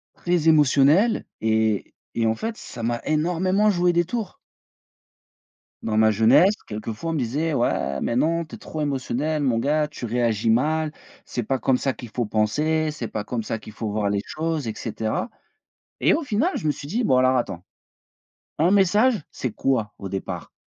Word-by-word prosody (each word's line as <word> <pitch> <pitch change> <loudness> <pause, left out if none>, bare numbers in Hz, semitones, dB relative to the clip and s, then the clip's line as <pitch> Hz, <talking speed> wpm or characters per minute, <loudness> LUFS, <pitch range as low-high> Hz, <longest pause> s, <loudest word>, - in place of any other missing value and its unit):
très 175 -2 +1
émotionnel 150 - +4
et 110 -2 0 0.2
et 115 - 0
en 110 - +1
fait, 225 - -4
ça 115 -2 -8
m'a 120 0 0
énormément 180 +6 +2
joué 175 -1 +2
des 175 0 +3
tours 220 0 -4 1.5
dans 110 -1 -1
ma 110 0 +5
jeunesse 130 - +5
quelquefois 110 +8 -5
on - - -1
me - - -1
disait: 145 +6 -1
«Ouais 70 - 0
mais 115 - -1
non 165 +5 +1
tu 155 - -19
es - - -11
trop 155 - -6
émotionnel 145 +2 -1
mon 125 -5 +1
gars, 150 +4 +1
tu 145 -5 -7
réagis 115 -1 +1
mal, 155 +6 +1 0.3
c'est 120 - -3
pas 135 +4 0
comme 130 +1 +2
ça 135 0 -1
qu'il 120 -3 -10
faut 120 0 -2
penser, 150 +10 +1
c'est 125 -6 -5
pas 105 - -4
comme 115 +2 -3
ça 110 - -3
qu'il 105 0 -12
faut 110 -2 -4
voir 105 -1 0
les 100 -1 0
choses 160 -4 -3
et 110 - -2
cetera». 110 - -3 0.7
Et - - +4
au 330 - 0
final, 270 - +1
je 155 - -3
me 150 - +3
suis 140 0 -9
dit: 235 +7 -1
«Bon 130 - +3
alors 130 0 +4
attends, 95 -8 -2 1.0
un 170 +5 +3
message 205 +3 +3
c'est 125 -5 -4
quoi 115 -6 0
au 100 - -6
départ?» 95 0 -5
135 Hz, 190 wpm, -23 LUFS, 110-165 Hz, 1.5 s, ma